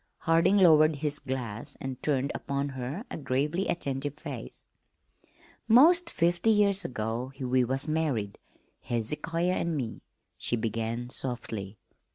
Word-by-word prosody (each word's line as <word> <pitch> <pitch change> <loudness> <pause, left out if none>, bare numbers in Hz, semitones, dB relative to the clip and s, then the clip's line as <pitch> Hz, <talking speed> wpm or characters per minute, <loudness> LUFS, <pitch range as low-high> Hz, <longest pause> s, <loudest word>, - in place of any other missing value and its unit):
Harding 165 +5 +3
lowered 155 -4 +6
his 145 0 -2
glass 125 -5 -5
and 130 -1 -6
turned 140 -2 0
upon 140 0 -3
her 135 - -5
a - - -4
gravely 150 +6 -1
attentive 140 -3 -1
face. 155 - -8 1.0
"'Most 335 +9 +6
fifty 175 - +1
years 200 -2 +4
ago 115 +2 -3
we 130 -1 +2
was 130 +4 -2
married, 145 -10 -1 0.4
Hezekiah 165 +9 -1
an' 170 -3 -1
me," 120 -5 -4 0.4
she - - 0
began 115 +1 -3
softly. 110 -6 -4
140 Hz, 125 wpm, -28 LUFS, 125-165 Hz, 1.0 s, lowered